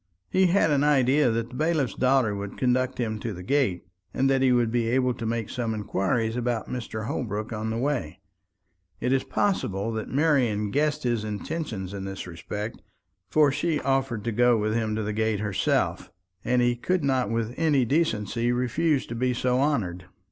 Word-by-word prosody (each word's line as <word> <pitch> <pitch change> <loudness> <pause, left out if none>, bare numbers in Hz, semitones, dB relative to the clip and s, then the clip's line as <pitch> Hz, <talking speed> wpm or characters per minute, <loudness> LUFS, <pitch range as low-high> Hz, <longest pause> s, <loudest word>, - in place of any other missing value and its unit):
He 190 0 +4
had 175 -3 +3
an 145 -1 +3
idea 140 -1 +4
that 115 +1 -1
the 125 - -11
bailiff's 155 - 0
daughter 130 -4 +2
would 100 0 -6
conduct 130 0 +1
him 110 -3 -2
to 110 0 -4
the 90 - -8
gate, 105 -7 0 0.3
and 135 - +2
that 135 -1 +2
he 130 -1 +4
would 120 -2 +2
be 120 -1 +1
able 125 +1 +2
to 115 -2 -5
make 115 -2 -2
some 115 -2 -2
inquiries 110 +2 -1
about 120 -2 -1
Mr. 110 -3 -5
Holbrook 110 -2 -3
on 110 0 -3
his 115 - -2
way. 130 - -2 0.8
It 125 - +1
is 135 - +2
possible 115 - -1
that 110 -1 -4
Marian 130 -9 +1
guessed 150 +2 0
his 120 -3 0
intentions 105 - -4
in 100 -1 -5
this 95 -1 -6
respect; 105 +6 -6 0.5
for 150 +2 +4
she 155 +2 0
offered 135 -5 0
to 115 - -1
go 120 +1 +4
with 110 0 0
him 110 -1 0
to 110 - -2
the 105 +1 -2
gate 110 -1 0
herself; 100 -2 0 0.3
and 125 0 +2
he 120 0 +2
could 180 +7 -1
not 130 -5 +1
with 115 0 -1
any 150 -6 +2
decency 120 - 0
refuse 130 +4 +1
to - - -7
be 125 +1 0
so 125 +1 +1
honoured. 100 - 0
120 Hz, 190 wpm, -26 LUFS, 110-135 Hz, 0.8 s, He